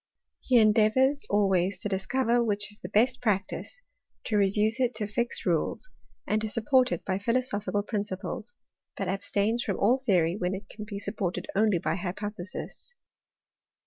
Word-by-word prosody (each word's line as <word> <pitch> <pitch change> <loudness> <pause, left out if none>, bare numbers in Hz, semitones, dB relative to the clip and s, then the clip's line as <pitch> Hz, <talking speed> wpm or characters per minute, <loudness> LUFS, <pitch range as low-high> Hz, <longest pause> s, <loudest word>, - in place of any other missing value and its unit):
He 255 - +3
endeavours 225 +6 +4
always 195 -2 +2
to - - -2
discover 235 +5 +1
which 205 -2 -1
is 210 - -8
the 180 - -7
best 245 +5 +2
practice, 220 - -2 0.4
to 215 - -2
reduce 210 +4 +2
it 250 -1 +1
to 210 - -1
fixed 235 +4 -2
rules, 180 - -1 0.3
and 215 +1 0
to 220 - -1
support 250 +3 +3
it - - -3
by 190 0 -1
philosophical 210 -2 -1
principles; 205 +2 -4 0.4
but - - -2
abstains 205 +4 0
from 195 - -2
all 240 +6 +3
theory 180 -7 +2
when 185 -1 -1
it 195 +1 -9
can 210 -1 -8
be 205 -1 -6
supported 200 -3 -3
only 210 -2 +3
by 165 - -1
hypothesis. 205 - -6
210 Hz, 155 wpm, -28 LUFS, 195-235 Hz, 0.4 s, endeavours